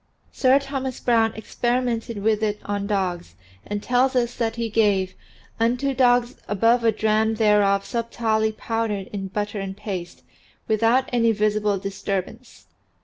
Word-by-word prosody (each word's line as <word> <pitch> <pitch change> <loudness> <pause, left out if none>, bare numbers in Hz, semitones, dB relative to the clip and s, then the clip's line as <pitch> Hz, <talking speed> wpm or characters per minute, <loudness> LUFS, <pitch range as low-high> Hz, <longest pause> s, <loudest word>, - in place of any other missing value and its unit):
Sir 260 0 +4
Thomas 270 -2 -4
Browne 225 -2 +2
experimented 235 -1 -2
with 220 0 +2
it 210 -1 -1
on 200 0 -2
dogs 180 - -2 0.3
and 205 0 -4
tells 255 +2 +2
us 240 -1 +1
that 225 -1 -2
he 230 -1 -2
gave 205 -4 +1 0.5
"unto 245 +4 +1
dogs 245 -1 +2
above 230 +4 +2
a 225 - +4
dram 220 +1 +1
thereof 205 -2 +3
sub 235 -1 -3
tilely 220 -2 +1
powdered 215 -3 -3
in 195 -1 -4
butter 205 +2 -3
and 195 0 -5
paste, 190 -4 -6 0.4
without 230 +4 +2
any 230 -1 +3
visible 210 -1 +1
disturbance." 195 +4 -5
220 Hz, 145 wpm, -23 LUFS, 205-235 Hz, 0.5 s, Sir